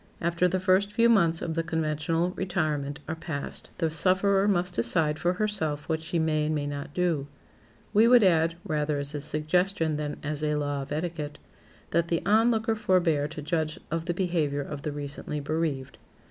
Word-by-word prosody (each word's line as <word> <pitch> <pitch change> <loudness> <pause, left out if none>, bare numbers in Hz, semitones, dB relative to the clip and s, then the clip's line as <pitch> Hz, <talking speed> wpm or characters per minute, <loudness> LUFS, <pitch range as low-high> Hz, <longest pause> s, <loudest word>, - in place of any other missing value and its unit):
After 170 +1 +2
the 185 +1 0
first 190 +2 +2
few 230 +2 +4
months 170 -7 +3
of 165 - -2
the 165 - 0
conventional 160 +1 -1
retirement 155 -7 -2
are 160 - -2
past 160 -3 -5
the 165 -2 0
sufferer 195 +4 +3
must 180 -2 +1
decide 150 +7 +1
for 175 +1 +1
herself 180 -8 -2
what 160 -1 -1
she 160 +2 -2
may 155 -2 +1
and 155 - 0
may 145 -1 -1
not 145 0 -5
do. 170 -6 0 0.7
We 220 +2 +6
would 245 -2 +7
add, 165 -3 +3
rather 150 -4 0
as 140 +1 -3
a 145 - -3
suggestion 160 +2 0
than 150 -1 -3
as 150 0 -3
a 150 0 +1
law 145 -1 -1
of 135 - -8
etiquette, 150 -2 -3 0.5
that 170 +1 +2
the 170 -1 0
onlooker 225 +2 +3
forbear 175 -9 +2
to 150 -1 -8
judge 155 0 -1
of 165 0 -2
the 175 -1 -1
behavior 165 -6 0
of 145 0 -6
the 150 - -3
recently 145 +1 -5
bereaved. 145 -3 -2
160 Hz, 185 wpm, -27 LUFS, 150-180 Hz, 0.7 s, would